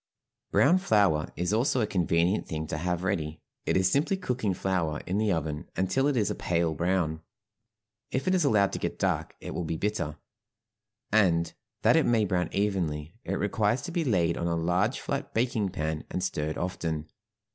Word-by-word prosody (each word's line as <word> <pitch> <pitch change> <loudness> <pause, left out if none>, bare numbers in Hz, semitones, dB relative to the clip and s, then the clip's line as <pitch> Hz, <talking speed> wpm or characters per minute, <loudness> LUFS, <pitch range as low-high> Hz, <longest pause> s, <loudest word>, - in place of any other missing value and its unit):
Brown 175 +6 +5
flour 100 - +2
is 90 +4 -1
also 125 +3 +2
a 110 - +2
convenient 90 0 +1
thing 80 0 -3
to 75 - -4
have 90 +1 -1
ready; 80 -5 -1 0.3
it - - +3
is 95 0 +3
simply 160 +8 +2
cooking 125 - -1
flour 90 -5 -1
in 95 +3 -1
the 110 -1 +2
oven 80 -3 -2
until 115 +9 +1
it 145 -3 +1
is 105 -4 +2
a - - 0
pale 85 -2 0
brown; 85 -1 0 0.9
if 130 +7 -2
it 185 - +3
is 180 -3 +3
allowed 100 -8 +3
to - - -2
get - - -3
dark - - -1
it - - -6
will 90 - -2
be 80 0 -2
bitter, 85 -6 -2 0.9
and, 90 -6 +3 0.3
that - - +6
it - - +4
may 115 -3 +3
brown 90 -3 0
evenly, 85 -7 -1
it 95 - -2
requires 105 +3 +1
to 175 - -5
be 170 -1 0
laid 85 - +2
on 85 - -1
a 85 - +1
large 90 +8 +1
flat 140 0 -4
baking 115 -4 +1
pan 80 -3 -3
and 90 - -3
stirred 75 -4 -2
often. 80 -4 -3
95 Hz, 190 wpm, -28 LUFS, 85-110 Hz, 0.9 s, that